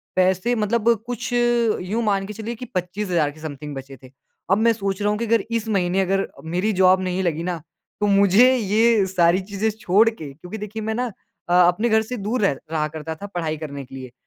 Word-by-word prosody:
पैसे 185 Hz, +6 st, +2 dB
मतलब 225 Hz, +1 st, +1 dB, 0.2 s
कुछ 245 Hz, 0 st, -4 dB
यूँ 235 Hz, -3 st, +1 dB
मान 200 Hz, -2 st, +1 dB
के 210 Hz, -, -6 dB
चलिए 225 Hz, +3 st, -5 dB
कि 250 Hz, -, -8 dB
25000 180 Hz, -4 st, -1 dB
के 155 Hz, -, -16 dB
समथिंग 150 Hz, -1 st, -7 dB
बचे 135 Hz, 0 st, -9 dB
थे। 130 Hz, -, -14 dB, 0.4 s
अब 195 Hz, -, +5 dB
मैं 230 Hz, +1 st, +4 dB
सोच 195 Hz, -2 st, -3 dB
रहा 205 Hz, -, +2 dB
हूँ 210 Hz, -, -1 dB
कि 235 Hz, -, -1 dB
अगर 230 Hz, -1 st, +2 dB
इस 230 Hz, -1 st, -1 dB
महीने 190 Hz, -2 st, +1 dB
अगर 195 Hz, +1 st, 0 dB, 0.3 s
मेरी 210 Hz, +4 st, +1 dB
जॉब 185 Hz, 0 st, +4 dB
नहीं 185 Hz, +1 st, -1 dB
लगी 165 Hz, -1 st, -1 dB
ना 175 Hz, -3 st, -3 dB, 0.4 s
तो 205 Hz, -, +2 dB
मुझे 200 Hz, +5 st, +5 dB
ये 220 Hz, -1 st, +3 dB
सारी 180 Hz, 0 st, +3 dB
चीज़ें 200 Hz, +3 st, -2 dB
छोड़ 215 Hz, +5 st, +4 dB
के 155 Hz, -11 st, -9 dB
क्योंकि 180 Hz, +8 st, -9 dB
देखिए 215 Hz, +1 st, -6 dB
मैं 220 Hz, 0 st, -2 dB
ना 250 Hz, +1 st, -1 dB, 0.4 s
अ, -, -, +2 dB
अपने 215 Hz, +7 st, +1 dB
घर 220 Hz, 0 st, +4 dB
से 245 Hz, +3 st, -5 dB
दूर 215 Hz, +4 st, -2 dB
रह 195 Hz, -9 st, +2 dB, 0.2 s
रहा 155 Hz, -1 st, 0 dB
करता 160 Hz, +1 st, -6 dB
था 200 Hz, +5 st, -8 dB
पढ़ाई 160 Hz, -3 st, -2 dB
करने 140 Hz, -3 st, -7 dB
के 130 Hz, -, -12 dB
लिए। 130 Hz, -2 st, -8 dB
195 Hz, 220 wpm, -22 LUFS, 175-220 Hz, 0.4 s, अब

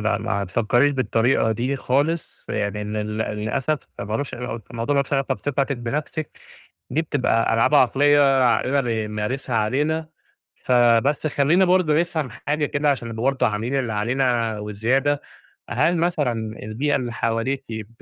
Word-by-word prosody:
لا 105 Hz, -1 st, 0 dB
ما 100 Hz, -3 st, -2 dB
تفكّريش 120 Hz, +8 st, +2 dB
بالطريقة 115 Hz, -2 st, +1 dB
دي 125 Hz, +5 st, -2 dB
خالص، 145 Hz, +6 st, -1 dB
يعني 105 Hz, 0 st, -2 dB
لل 105 Hz, 0 st, -3 dB
للأسف 110 Hz, +8 st, -1 dB, 0.2 s
مالوش 110 Hz, +7 st, -3 dB
علاقة 120 Hz, -2 st, -5 dB
الموضوع 120 Hz, +5 st, -2 dB
مالوش 140 Hz, 0 st, 0 dB
علاقة 135 Hz, -1 st, +1 dB
بثقتِك 140 Hz, 0 st, -1 dB
بنفسِك 150 Hz, +6 st, -4 dB, 0.5 s
دي 155 Hz, +6 st, +1 dB
بتبقى 125 Hz, -7 st, +1 dB
ألعاب 115 Hz, +6 st, +3 dB
عقلية 140 Hz, 0 st, +4 dB
عقلنا 130 Hz, +3 st, +2 dB
بيمارسها 115 Hz, +2 st, -2 dB
علينا، 150 Hz, +9 st, 0 dB, 0.6 s
فبس 125 Hz, +4 st, +3 dB
خلّينا 155 Hz, +6 st, +3 dB
برضه 180 Hz, -4 st, +3 dB
نفهم 160 Hz, -5 st, -3 dB
حاجة 145 Hz, +7 st, -2 dB
كده 145 Hz, +1 st, 0 dB
عشان 120 Hz, -4 st, -3 dB
نبقى 115 Hz, 0 st, -5 dB
برضه 135 Hz, 0 st, +2 dB
عاملين 115 Hz, +6 st, -1 dB
اللي 120 Hz, -4 st, -2 dB
علينا 115 Hz, 0 st, 0 dB
وزيادة، 120 Hz, +8 st, 0 dB, 0.5 s
هل 155 Hz, +7 st, +2 dB
مثلًا 160 Hz, -7 st, +1 dB, 0.3 s
البيئة 120 Hz, +8 st, -1 dB
اللي 125 Hz, -3 st, -2 dB
حواليكِ 115 Hz, +4 st, -1 dB
ب 110 Hz, -2 st, -5 dB
130 Hz, 140 wpm, -22 LUFS, 110-145 Hz, 0.6 s, عقلية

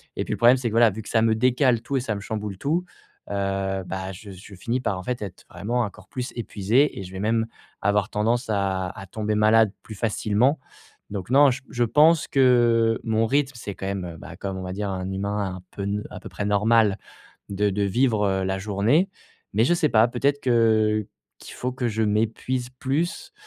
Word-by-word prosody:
et -, -, -1 dB
puis -, -, -6 dB
le -, -, -3 dB
problème, 120 Hz, +2 st, +6 dB
c'est 125 Hz, -2 st, -2 dB
que, -, -, -7 dB
voilà, 115 Hz, 0 st, +6 dB
vu 110 Hz, +2 st, -6 dB
que -, -, -10 dB
ça 115 Hz, -, +2 dB
me 110 Hz, 0 st, +3 dB
décale 125 Hz, 0 st, +2 dB
tout 140 Hz, -, -1 dB
et -, -, 0 dB
ça 115 Hz, -3 st, -2 dB
me 100 Hz, -, -6 dB
chamboule 105 Hz, -2 st, -5 dB
tout, 165 Hz, +8 st, 0 dB, 0.5 s
heu, 95 Hz, -1 st, -1 dB
bah 95 Hz, +1 st, -4 dB
je 100 Hz, +3 st, -11 dB
je 95 Hz, +2 st, -12 dB
finis 115 Hz, +7 st, -2 dB
par, 105 Hz, -6 st, -1 dB
en -, -, -7 dB
fait, 125 Hz, +1 st, -3 dB
être 95 Hz, -4 st, -8 dB
vraiment 120 Hz, +4 st, -2 dB
encore 100 Hz, -3 st, -6 dB
plus 125 Hz, -1 st, -4 dB
épuisé 115 Hz, +3 st, +1 dB
et -, -, -5 dB
je 90 Hz, -, -10 dB
vais 95 Hz, -, -6 dB
même 110 Hz, +2 st, +1 dB, 0.3 s
avoir 100 Hz, 0 st, +1 dB
tendance 115 Hz, +4 st, 0 dB
à 95 Hz, -2 st, 0 dB
à 100 Hz, +2 st, -9 dB
tomber 105 Hz, +2 st, -2 dB
malade 110 Hz, 0 st, +4 dB
plus 110 Hz, -, -9 dB
facilement. 110 Hz, +6 st, +1 dB, 0.5 s
Donc 95 Hz, -2 st, -5 dB
non, 140 Hz, 0 st, +6 dB
j 125 Hz, -, -4 dB
je 120 Hz, -, 0 dB
pense 155 Hz, +6 st, +4 dB
que 120 Hz, -4 st, +4 dB
mon 110 Hz, -1 st, +1 dB
rythme, 140 Hz, +2 st, +1 dB
c'est 100 Hz, -4 st, -7 dB
quand -, -, -7 dB
même, 100 Hz, -2 st, -3 dB
heu, 85 Hz, -1 st, -8 dB
bah, -, -, -10 dB
comme 95 Hz, -1 st, -4 dB
on 95 Hz, -, -5 dB
va 90 Hz, -, -5 dB
dire 100 Hz, +1 st, -3 dB
un 95 Hz, 0 st, -3 dB
humain 100 Hz, -1 st, -2 dB
un 90 Hz, -, -13 dB
peu 100 Hz, -, -6 dB
n 100 Hz, +1 st, -2 dB
à -, -, -8 dB
peu -, -, -9 dB
près 105 Hz, -, -4 dB
normal, 105 Hz, 0 st, +3 dB, 0.5 s
de 100 Hz, +1 st, +1 dB
de 100 Hz, +1 st, -1 dB
vivre, 110 Hz, 0 st, +2 dB
heu, 95 Hz, -1 st, 0 dB
la 95 Hz, 0 st, -1 dB
journée. 105 Hz, -, +2 dB, 0.5 s
Mais 110 Hz, +3 st, +4 dB
je 145 Hz, -, +3 dB
sais 160 Hz, -3 st, +2 dB
pas, 110 Hz, +1 st, +5 dB
peut-être 140 Hz, +4 st, 0 dB
que 110 Hz, -3 st, +2 dB, 0.3 s
qu'il -, -, -11 dB
faut 125 Hz, -, -3 dB
que 125 Hz, -1 st, -2 dB
je 110 Hz, 0 st, -1 dB
m'épuise 115 Hz, +4 st, -1 dB
plus, 140 Hz, +7 st, -2 dB
110 Hz, 220 wpm, -24 LUFS, 100-120 Hz, 0.5 s, problème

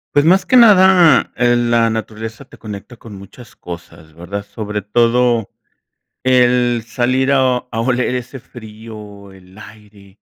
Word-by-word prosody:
Pues 145 Hz, -, +4 dB
más 185 Hz, +2 st, +3 dB
que 255 Hz, -, +1 dB
nada, 190 Hz, -7 st, +5 dB
eh, 120 Hz, 0 st, +2 dB
la 120 Hz, -1 st, +1 dB
naturaleza 110 Hz, 0 st, -6 dB
te -, -, -18 dB
conecta 105 Hz, +3 st, -10 dB
con 110 Hz, -2 st, -13 dB
muchas 100 Hz, +5 st, -15 dB
cosas, 85 Hz, -2 st, -12 dB
¿verdad? 95 Hz, +5 st, -7 dB
Sobre 105 Hz, 0 st, -6 dB
todo 115 Hz, +1 st, +1 dB, 0.7 s
el 125 Hz, -2 st, +2 dB
salir 130 Hz, +3 st, -1 dB
a 130 Hz, -2 st, +2 dB
a 115 Hz, -, -4 dB
oler 125 Hz, +1 st, -1 dB
ese 125 Hz, +2 st, -7 dB
frío, 105 Hz, -3 st, -13 dB
el 95 Hz, +1 st, -19 dB
aire, 105 Hz, -2 st, -17 dB
115 Hz, 140 wpm, -16 LUFS, 105-125 Hz, 0.7 s, nada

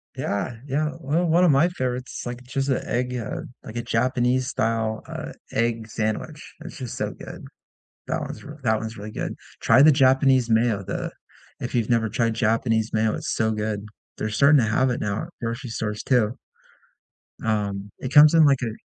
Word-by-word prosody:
Yeah. 100 Hz, +4 st, -2 dB
Yeah. 150 Hz, +3 st, 0 dB
Well, 155 Hz, +6 st, +1 dB
one 170 Hz, +2 st, +4 dB
of 175 Hz, -, +5 dB
my 140 Hz, +6 st, +4 dB
favorites, 130 Hz, -6 st, -4 dB
like, 120 Hz, +1 st, -6 dB
just 135 Hz, +2 st, -2 dB
a 130 Hz, -, -1 dB
egg, 125 Hz, +1 st, -1 dB
uh 115 Hz, -, -4 dB, 0.2 s
like 110 Hz, -, -9 dB
a -, -, 0 dB
Japanese-style, 120 Hz, -2 st, 0 dB
uh, -, -, -6 dB, 0.2 s
egg 115 Hz, -1 st, 0 dB
sandwich. 110 Hz, +8 st, -4 dB
It's 175 Hz, -, -9 dB
just 125 Hz, -4 st, -6 dB
so -, -, -2 dB
good. -, -, -10 dB, 0.6 s
That -, -, -1 dB
one's -, -, -7 dB
r 150 Hz, +1 st, -10 dB
that 110 Hz, -2 st, +2 dB
one's 110 Hz, 0 st, -6 dB
really 105 Hz, +1 st, -7 dB
good. -, -, -4 dB, 0.3 s
Try 130 Hz, -, +6 dB
the 155 Hz, -, +8 dB
Japanese 130 Hz, -2 st, +4 dB
mayo. 110 Hz, -3 st, +2 dB
The -, -, -4 dB, 0.5 s
if -, -, -5 dB
you've 115 Hz, -2 st, 0 dB
never 115 Hz, -2 st, +2 dB
tried 115 Hz, +1 st, 0 dB
Japanese 115 Hz, 0 st, +1 dB
mayo, 110 Hz, 0 st, +2 dB
it's -, -, -4 dB
so 110 Hz, 0 st, +1 dB
good. 105 Hz, -1 st, -3 dB, 0.3 s
They're 110 Hz, -, -2 dB
starting 140 Hz, +7 st, +5 dB
to 105 Hz, -, 0 dB
have 130 Hz, +4 st, +2 dB
it 120 Hz, -, -2 dB
now 105 Hz, 0 st, -2 dB
at -, -, -8 dB
grocery 115 Hz, +2 st, -4 dB
stores 105 Hz, -1 st, -3 dB
too. 120 Hz, -3 st, +2 dB, 1.1 s
Um, 105 Hz, -2 st, -1 dB
it 130 Hz, +2 st, -5 dB
comes 150 Hz, +1 st, +8 dB
in 160 Hz, -2 st, +7 dB
like 135 Hz, -2 st, +4 dB
a 115 Hz, -3 st, -2 dB
120 Hz, 190 wpm, -24 LUFS, 110-135 Hz, 1.1 s, the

